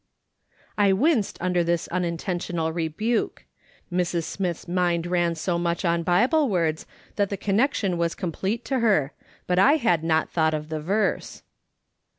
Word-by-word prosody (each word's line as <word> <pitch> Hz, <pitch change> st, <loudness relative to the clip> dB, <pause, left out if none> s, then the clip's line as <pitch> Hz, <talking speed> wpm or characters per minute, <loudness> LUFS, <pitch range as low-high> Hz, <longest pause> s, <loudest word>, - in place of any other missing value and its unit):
I 200 Hz, -2 st, +5 dB
winced 245 Hz, -, +1 dB
under 180 Hz, -1 st, +1 dB
this 170 Hz, -1 st, 0 dB
unintentional 175 Hz, -1 st, -2 dB
rebuke. 175 Hz, +8 st, -2 dB, 0.5 s
Mrs. 175 Hz, -1 st, 0 dB
Smith's 180 Hz, -1 st, -4 dB
mind 175 Hz, -1 st, 0 dB
ran 175 Hz, -1 st, +1 dB
so 170 Hz, +2 st, -1 dB
much 170 Hz, +1 st, -1 dB
on 170 Hz, 0 st, +2 dB
Bible 245 Hz, -, +3 dB
words 165 Hz, -5 st, 0 dB, 0.3 s
that 200 Hz, -2 st, +1 dB
the 200 Hz, -, -3 dB
connection 200 Hz, -3 st, 0 dB
was 170 Hz, 0 st, 0 dB
complete 195 Hz, +7 st, -3 dB
to 265 Hz, -2 st, 0 dB
her, 195 Hz, -, +2 dB, 0.3 s
but 180 Hz, 0 st, +1 dB
I 275 Hz, +9 st, +6 dB
had 230 Hz, -, +2 dB
not 160 Hz, -1 st, +1 dB
thought 160 Hz, -2 st, +2 dB
of 150 Hz, 0 st, -6 dB
the 155 Hz, -1 st, -3 dB
verse. 200 Hz, +7 st, -1 dB
175 Hz, 150 wpm, -25 LUFS, 170-200 Hz, 0.5 s, I